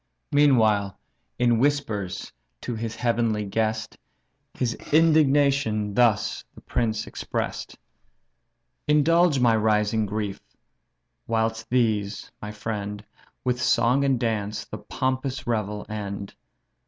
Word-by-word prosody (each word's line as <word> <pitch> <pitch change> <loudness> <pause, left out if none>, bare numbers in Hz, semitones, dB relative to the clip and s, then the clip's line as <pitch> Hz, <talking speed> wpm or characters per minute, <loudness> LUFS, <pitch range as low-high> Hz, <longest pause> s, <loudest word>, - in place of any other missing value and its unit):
Meanwhile, 110 -9 +3 0.4
in 120 -2 +3
whispers 110 -9 -1 0.3
to 120 - -4
his 115 0 -4
heavenly 115 -3 0
guest 110 +1 -2 0.6
His 120 -2 -1 0.2
indignation 140 -9 +3
thus 110 -2 +2
the - - -13
prince 110 -2 -1
express'd: - - -4 1.1
"Indulge 155 +1 +4
my 120 -2 +4
rising 105 0 +2
grief, 105 -1 -3 0.9
whilst 115 0 -1
these 110 -5 0
(my 105 - -5
friend) 105 -1 -5 0.4
With 125 -1 0
song 120 +3 +3
and 135 -3 +2
dance 105 -3 -2
the 105 - -8
pompous 130 +4 -2
revel 105 -3 -2
end. 100 -2 -5
115 Hz, 105 wpm, -25 LUFS, 105-130 Hz, 1.1 s, Indulge